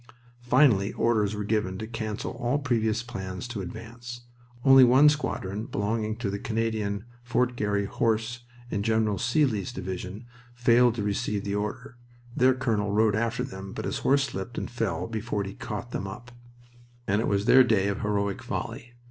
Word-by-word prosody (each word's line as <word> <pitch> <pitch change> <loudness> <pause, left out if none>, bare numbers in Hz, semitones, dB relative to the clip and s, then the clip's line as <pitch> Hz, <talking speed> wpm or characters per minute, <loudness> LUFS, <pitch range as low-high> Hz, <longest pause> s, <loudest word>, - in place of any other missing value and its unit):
Finally 120 -5 +4
orders 110 -3 +1
were 105 - -3
given 105 -3 -1
to 110 - -5
cancel 110 -2 -4
all 120 +4 -1
previous 115 -5 0
plans 95 -4 -6
to 120 -4 -5
advance. 115 +5 -8 0.4
Only 135 -1 +9
one 130 +4 +7
squadron, 110 -8 -2
belonging 110 +1 -1
to 110 -4 -3
the 100 - -3
Canadian 110 -2 -2 0.2
Fort 120 +1 0
Garry 100 -3 0
Horse 115 +2 0 0.3
in 100 - -1
General 110 -2 +1
Seely's 120 - +1
division, 95 +4 -6 0.3
failed 120 0 +4
to 110 - -2
receive 105 0 -1
the 100 -1 -3
order 105 +5 -4 0.4
(their 130 +1 +4
colonel 110 -6 0
rode 105 0 +3
after 115 +2 0
them, 95 -6 -7
but - - -5
his - - -2
horse 140 0 +3
slipped 120 -3 -5
and - - -4
fell 115 -4 -1
before 110 -2 -3
he 95 0 -6
caught 115 +1 -6
them 95 - -3
up), 120 +5 -9 0.7
and 100 0 +1
it - - -1
was 100 0 +1
their 130 +2 +8
day 105 -5 +2
of 100 - -2
heroic 100 -1 -1
folly. 120 +1 -5
110 Hz, 170 wpm, -27 LUFS, 100-120 Hz, 0.7 s, Only